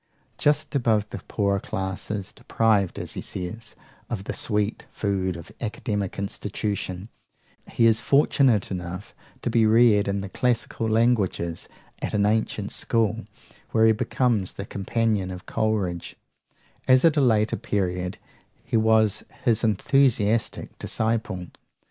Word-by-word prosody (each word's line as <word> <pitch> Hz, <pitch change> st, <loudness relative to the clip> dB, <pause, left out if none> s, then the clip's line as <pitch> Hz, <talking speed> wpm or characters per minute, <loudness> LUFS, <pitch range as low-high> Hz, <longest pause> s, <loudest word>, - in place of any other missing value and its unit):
Just 150 Hz, +1 st, +2 dB
above 115 Hz, -6 st, +2 dB
the -, -, -5 dB
poorer 100 Hz, -2 st, +1 dB
class, 95 Hz, 0 st, -4 dB, 0.3 s
deprived, 105 Hz, -5 st, +1 dB
as -, -, -5 dB
he -, -, -4 dB
says, 105 Hz, +5 st, -6 dB, 0.3 s
of 110 Hz, -5 st, -3 dB
the -, -, -4 dB
"sweet 105 Hz, -1 st, -1 dB
food 95 Hz, -3 st, -1 dB
of 85 Hz, -1 st, -10 dB
academic 105 Hz, -3 st, -3 dB
institution," 100 Hz, -1 st, -3 dB, 0.6 s
he 115 Hz, -, +2 dB
is 115 Hz, -1 st, +4 dB
fortunate 135 Hz, -7 st, +3 dB
enough 90 Hz, +4 st, -6 dB, 0.3 s
to 120 Hz, -, -1 dB
be 115 Hz, -1 st, +4 dB
reared 110 Hz, -2 st, +5 dB
in 100 Hz, 0 st, -1 dB
the 100 Hz, -, -6 dB
classical 115 Hz, -1 st, -1 dB
languages 110 Hz, -7 st, +1 dB, 0.3 s
at -, -, -2 dB
an 100 Hz, -1 st, +3 dB
ancient 105 Hz, -1 st, 0 dB
school, 115 Hz, -1 st, 0 dB, 0.5 s
where 110 Hz, 0 st, +5 dB
he 110 Hz, -, +6 dB
becomes 115 Hz, -3 st, 0 dB
the 100 Hz, -, -6 dB
companion 105 Hz, -1 st, -1 dB
of 90 Hz, -1 st, -8 dB
Coleridge, 105 Hz, -6 st, -1 dB, 0.7 s
as 130 Hz, +2 st, +6 dB
at 165 Hz, -, +5 dB
a 145 Hz, -, +3 dB
later 110 Hz, -4 st, +3 dB
period 90 Hz, -1 st, -2 dB, 0.5 s
he -, -, +1 dB
was 110 Hz, -2 st, +3 dB, 0.2 s
his 115 Hz, 0 st, +2 dB
enthusiastic 115 Hz, -1 st, +1 dB
disciple. 110 Hz, -5 st, -1 dB
110 Hz, 130 wpm, -25 LUFS, 100-115 Hz, 0.7 s, he